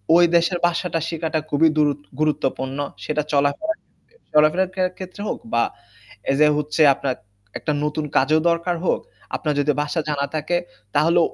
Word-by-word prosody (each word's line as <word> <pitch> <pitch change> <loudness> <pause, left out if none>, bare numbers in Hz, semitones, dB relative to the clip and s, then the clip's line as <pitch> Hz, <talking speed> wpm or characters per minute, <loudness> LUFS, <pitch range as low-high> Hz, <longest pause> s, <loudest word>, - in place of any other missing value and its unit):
ওই 175 0 +7
দেশের 170 +1 +3
ভাষাটা 170 -1 -1
শিখাটা 160 -1 -1
খুবই 155 +2 +4
দুরুত 145 -2 +2 0.2
গুরুত্বপূর্ণ। 135 -3 0 0.3
সেটা 150 0 0
চলাফেরার 145 - +1 0.3
ক্ষেত্রে 475 - -31
চলাফেরার 155 +5 +4
কে 190 - -1 0.2
ক্ষেত্রে 185 +1 -8
হোক - - -3
বা 115 - +4 0.7
এই - - +2
যে 150 - +7
হচ্ছে 150 +2 -1
আপনার 135 -1 -2 0.4
একটা - - -2
নতুন 150 0 -1
কাজও 155 +4 +4
দরকার 170 +1 0
হোক, - - +2 0.4
আপনার 150 -2 -1
যদি 145 +1 +3
ভাষা 150 +3 -2
জানা 140 -1 0
থাকে, 155 +3 0 0.4
তাহলে 165 +4 +4
155 Hz, 160 wpm, -22 LUFS, 145-170 Hz, 0.7 s, ওই